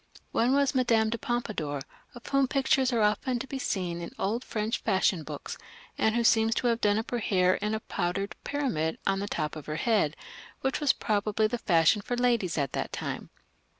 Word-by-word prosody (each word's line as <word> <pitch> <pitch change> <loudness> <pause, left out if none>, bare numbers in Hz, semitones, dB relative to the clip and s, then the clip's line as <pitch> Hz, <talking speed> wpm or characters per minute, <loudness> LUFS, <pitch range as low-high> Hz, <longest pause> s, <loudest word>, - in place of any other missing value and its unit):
One 245 +3 +2
was 280 -1 +3
the 270 - -1
Madame 225 -3 +3
de 235 - -2
Pompadour, 210 - -2 0.4
of 240 - -12
whom 275 -1 +2
pictures 265 -1 +2
are 230 -3 +2
often 215 +4 +1
to 250 - -4
be 270 0 -5
seen 175 -7 -2
in 170 - -5
old 225 +6 -1
French 215 -1 -2
fashion 190 -4 +1
books, - - -7 0.4
and 220 0 +1
who 235 - +2
seems 225 0 +4
to - - -1
have 230 0 0
done 205 0 +3
up 220 - -3
her 240 - 0
hair 185 -4 +3
in 210 +2 -1
a 220 - -4
powdered 195 +1 -2
pyramid 240 - -1
on 195 0 +1
the 200 - -3
top 155 -6 -2
of 155 - -9
her 150 - -3
head, 170 -5 +1 0.5
which 265 0 0
was 295 -3 +4
probably 215 0 0
the 235 +3 -1
fashion 170 +1 +3
for 245 +4 -3
ladies 235 -9 +1
of 140 -3 0
that - - -3
time. - - -5
220 Hz, 210 wpm, -28 LUFS, 185-240 Hz, 0.5 s, seems